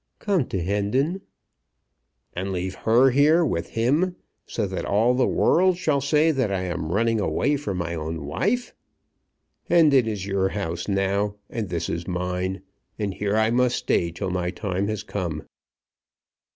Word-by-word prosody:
"Come 190 Hz, -, 0 dB
to 95 Hz, -, -2 dB
Hendon." 105 Hz, -, 0 dB, 1.1 s
"And 95 Hz, +2 st, -3 dB
leave 95 Hz, 0 st, -3 dB
her 120 Hz, +6 st, +4 dB
here 155 Hz, +6 st, +4 dB
with 85 Hz, -, -2 dB
him, 150 Hz, +11 st, +2 dB, 0.3 s
so 110 Hz, -, -2 dB
that 95 Hz, -2 st, -4 dB
all 110 Hz, +5 st, +2 dB
the 125 Hz, 0 st, +2 dB
world 185 Hz, 0 st, +3 dB
shall 150 Hz, -6 st, +1 dB
say 150 Hz, +3 st, +3 dB
that 130 Hz, -8 st, 0 dB
I 95 Hz, -1 st, -1 dB
am 85 Hz, -3 st, -3 dB
running 115 Hz, +3 st, +1 dB
away 145 Hz, +7 st, +1 dB
from 105 Hz, -10 st, -3 dB
my 85 Hz, -1 st, -3 dB
own 80 Hz, -2 st, -4 dB
wife? 225 Hz, -, -1 dB, 1.0 s
Hendon 150 Hz, -8 st, +5 dB
is 105 Hz, -4 st, -3 dB
your 95 Hz, -1 st, 0 dB
house 85 Hz, -5 st, -4 dB
now, 100 Hz, +1 st, 0 dB, 0.2 s
and 110 Hz, -5 st, -3 dB
this 85 Hz, -1 st, -2 dB
is 85 Hz, 0 st, -4 dB
mine; 90 Hz, +1 st, -2 dB, 0.3 s
and 105 Hz, -3 st, -2 dB
here 100 Hz, +1 st, -1 dB
I 110 Hz, +1 st, +3 dB
must 125 Hz, 0 st, +2 dB
stay 85 Hz, -, 0 dB
till 95 Hz, +3 st, -4 dB
my 90 Hz, -1 st, -1 dB
time 95 Hz, +1 st, -2 dB
has 110 Hz, -1 st, -3 dB
come." 85 Hz, -6 st, -4 dB
100 Hz, 160 wpm, -24 LUFS, 90-135 Hz, 1.1 s, Hendon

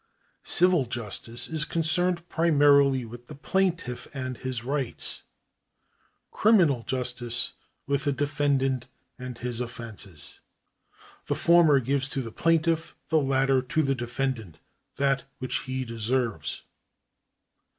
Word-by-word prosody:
Civil 175 Hz, -5 st, +6 dB
justice 115 Hz, 0 st, -4 dB
is 160 Hz, -2 st, 0 dB
concerned 170 Hz, +2 st, +1 dB
primarily 140 Hz, -6 st, +4 dB
with 120 Hz, +2 st, -11 dB
the 150 Hz, -, -9 dB
plaintiff 165 Hz, -4 st, -1 dB
and 130 Hz, -2 st, -4 dB
his 130 Hz, -3 st, -4 dB
rights; 135 Hz, -1 st, -2 dB, 1.1 s
criminal 175 Hz, -, +4 dB
justice 125 Hz, -2 st, -1 dB, 0.3 s
with 140 Hz, 0 st, -1 dB
the 145 Hz, -, +2 dB
defendant 135 Hz, -2 st, 0 dB, 0.3 s
and 125 Hz, -1 st, -7 dB
his 120 Hz, 0 st, -3 dB
offences. 110 Hz, -9 st, -6 dB, 0.9 s
The -, -, 0 dB
former 170 Hz, -4 st, +5 dB
gives 135 Hz, +2 st, 0 dB
to 135 Hz, -2 st, -2 dB
the 115 Hz, -, -7 dB
plaintiff, 165 Hz, +2 st, +1 dB
the 160 Hz, -, +4 dB
latter 135 Hz, -1 st, +2 dB
to 145 Hz, +5 st, 0 dB
the 135 Hz, -1 st, +1 dB
defendant, 120 Hz, -6 st, -3 dB, 0.4 s
that 135 Hz, 0 st, +1 dB
which 130 Hz, -, -2 dB
he 130 Hz, 0 st, -2 dB
deserves. 115 Hz, -, -2 dB
135 Hz, 115 wpm, -27 LUFS, 120-150 Hz, 1.1 s, Civil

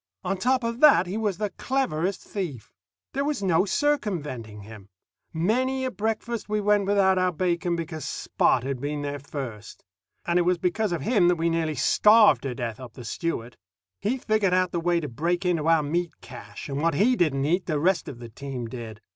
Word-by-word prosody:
On -, -, -1 dB
top 250 Hz, +6 st, +1 dB
of 230 Hz, +1 st, -2 dB
that, 275 Hz, -, +7 dB
he 185 Hz, +3 st, -5 dB
was 210 Hz, -5 st, -1 dB
the 210 Hz, -1 st, -2 dB
cleverest 195 Hz, -9 st, -1 dB
thief. 165 Hz, -, -6 dB, 0.4 s
These 275 Hz, -, -1 dB
was 285 Hz, -6 st, -1 dB
no 185 Hz, 0 st, +3 dB
circumventing 155 Hz, -, -2 dB
him. 105 Hz, -2 st, -12 dB, 0.4 s
Many 255 Hz, +10 st, 0 dB
a 255 Hz, -, -2 dB
breakfast 225 Hz, 0 st, -3 dB
we 210 Hz, 0 st, +1 dB
went 205 Hz, -1 st, +2 dB
without 190 Hz, -2 st, +3 dB
our 185 Hz, 0 st, +2 dB
bacon 175 Hz, 0 st, 0 dB
because 160 Hz, -2 st, -5 dB
Spot 120 Hz, -, +1 dB
had 135 Hz, -2 st, -3 dB
been 145 Hz, 0 st, -3 dB
there 145 Hz, 0 st, -4 dB
first. 125 Hz, -7 st, -8 dB, 0.4 s
And 175 Hz, +1 st, +2 dB
it -, -, +4 dB
was 180 Hz, +1 st, +2 dB
because 185 Hz, +4 st, 0 dB
of 165 Hz, -5 st, -2 dB
him 205 Hz, -, +3 dB
that 175 Hz, -, +4 dB
we 165 Hz, 0 st, 0 dB
nearly 160 Hz, -2 st, -1 dB
starved 210 Hz, -, +5 dB
to 130 Hz, -3 st, -4 dB
death 120 Hz, -3 st, -4 dB
up 125 Hz, -3 st, -10 dB
the 125 Hz, -, -10 dB
Stewart. 125 Hz, -4 st, -4 dB, 0.4 s
He 235 Hz, +6 st, -1 dB
figured 215 Hz, -6 st, +1 dB
out 185 Hz, -1 st, +1 dB
the 170 Hz, -, -1 dB
way 175 Hz, 0 st, +2 dB
to 150 Hz, -, -4 dB
break 170 Hz, +8 st, -1 dB
into 165 Hz, -3 st, +1 dB
our 165 Hz, -2 st, +4 dB
meat 165 Hz, +2 st, -2 dB
cache, 105 Hz, +1 st, -10 dB
and 140 Hz, 0 st, -3 dB
what 165 Hz, -2 st, +1 dB
he 240 Hz, -, +3 dB
didn't 140 Hz, -, +1 dB
eat, 175 Hz, +5 st, 0 dB
the 155 Hz, -4 st, 0 dB
rest 185 Hz, +4 st, +1 dB
of 125 Hz, -, -8 dB
the 120 Hz, -1 st, -9 dB
team 130 Hz, +1 st, -6 dB
did. 115 Hz, -2 st, -8 dB
175 Hz, 205 wpm, -25 LUFS, 145-205 Hz, 0.4 s, that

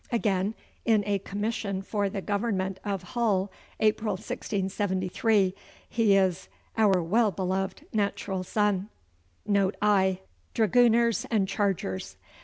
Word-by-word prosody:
Again, 210 Hz, -3 st, 0 dB, 0.3 s
in 220 Hz, -3 st, +3 dB
a 200 Hz, -1 st, 0 dB
commission 200 Hz, -1 st, -3 dB
for 200 Hz, 0 st, -1 dB
the 195 Hz, -1 st, -5 dB
government 200 Hz, -3 st, -1 dB
of 195 Hz, -3 st, -3 dB
Hull, 200 Hz, -2 st, 0 dB, 0.3 s
April 215 Hz, 0 st, +2 dB
1673, 195 Hz, -1 st, 0 dB, 0.3 s
he 220 Hz, -4 st, +3 dB
is 185 Hz, -2 st, +1 dB, 0.3 s
'our 195 Hz, -5 st, +3 dB
well 215 Hz, +6 st, +3 dB
beloved 190 Hz, 0 st, -2 dB
natural 200 Hz, -2 st, -1 dB
son.' 205 Hz, 0 st, 0 dB, 0.6 s
Note 200 Hz, -2 st, +2 dB
I. 190 Hz, -3 st, +2 dB, 0.3 s
Dragooners 235 Hz, +2 st, +3 dB
and 210 Hz, -4 st, +2 dB
Chargers. 165 Hz, -, -2 dB
200 Hz, 110 wpm, -27 LUFS, 190-215 Hz, 0.6 s, in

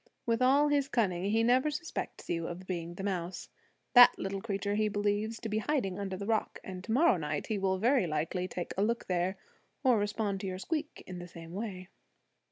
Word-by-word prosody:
With 230 Hz, +1 st, +1 dB
all 280 Hz, +4 st, +5 dB
his 285 Hz, -2 st, +2 dB
cunning 190 Hz, -9 st, 0 dB
he 220 Hz, +3 st, +2 dB
never 255 Hz, +5 st, +4 dB
suspects 310 Hz, +3 st, -5 dB
you 165 Hz, -1 st, -1 dB
of 180 Hz, +2 st, -7 dB
being 175 Hz, -2 st, -4 dB
the 195 Hz, -, -6 dB
mouse. 180 Hz, -2 st, -3 dB, 0.4 s
That 245 Hz, -1 st, +9 dB
little 195 Hz, 0 st, -3 dB
creature 200 Hz, -1 st, -2 dB
he 215 Hz, +1 st, +2 dB
believes 205 Hz, +2 st, -1 dB
to 230 Hz, -, -3 dB
be 215 Hz, 0 st, 0 dB
hiding 215 Hz, -8 st, -1 dB
under 195 Hz, -2 st, -3 dB
the 200 Hz, -, -5 dB
rock; 220 Hz, 0 st, 0 dB
and 185 Hz, -1 st, -7 dB
to 220 Hz, -, -4 dB
morrow 250 Hz, -, +5 dB
night 150 Hz, -2 st, -3 dB
he 215 Hz, -2 st, -2 dB
will 190 Hz, -1 st, +1 dB
very 235 Hz, -1 st, +3 dB
likely 160 Hz, +4 st, -1 dB
take 180 Hz, -1 st, -5 dB
a 195 Hz, -, 0 dB
look 235 Hz, +2 st, 0 dB
there, 180 Hz, +1 st, 0 dB, 0.5 s
or 250 Hz, -5 st, +5 dB
respond 205 Hz, -1 st, -1 dB
to 195 Hz, -, -4 dB
your 185 Hz, -1 st, -3 dB
squeak 305 Hz, -, -4 dB
in 185 Hz, -1 st, -7 dB
the 175 Hz, -, -7 dB
same 165 Hz, -1 st, -11 dB
way. 190 Hz, -3 st, -5 dB
200 Hz, 210 wpm, -31 LUFS, 185-230 Hz, 0.5 s, That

